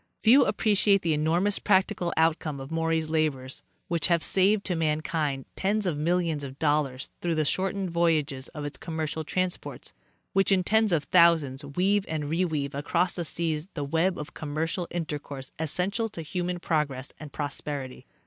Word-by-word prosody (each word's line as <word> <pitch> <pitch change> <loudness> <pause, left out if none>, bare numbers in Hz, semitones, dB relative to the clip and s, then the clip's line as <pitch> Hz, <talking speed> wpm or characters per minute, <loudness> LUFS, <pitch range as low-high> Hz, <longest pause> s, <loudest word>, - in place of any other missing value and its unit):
Few 250 +5 +7
appre 210 +1 +1
ciate 200 -1 +4
the 165 -2 +1
enormous 170 +7 +2
practical 190 -3 +2
outcome 160 -2 +1
of 135 +2 -8
Maury's 165 -1 0
labors, 140 -5 -1 0.3
which 170 -1 +1
have 170 -2 +2
saved 200 +2 +3
to 180 - 0
mankind 155 -3 -1
tens 205 +2 0
of 175 -4 0
millions 165 -1 0
of 135 -1 -7
dollars 145 -4 0
through 170 -2 0
the 155 -1 +1
shortened 190 +3 -1
voyages 160 -5 +1
of 150 -2 -7
its 145 -1 -4
commercial 160 -1 -3
transports, 185 +3 -3 0.4
which 195 +1 +3
in 190 -2 +4
tens 220 +1 +3
of 160 -4 +2
thousands, 160 -6 +4
weave 185 +8 +1
and 155 -1 -2
reweave 155 -2 -1
across 170 +5 0
the 175 - -3
seas 160 0 -2
the 145 - -2
web 165 +6 +1
of 150 - -7
com 145 -2 -6
mercial 165 +3 -1
intercourse 145 -5 -5
essential 190 +8 -1
to 165 -5 -7
human 175 +3 -3
progress 145 -6 -1
and 155 -2 -9
prosperity. 145 -2 -5
160 Hz, 165 wpm, -27 LUFS, 150-180 Hz, 0.4 s, Few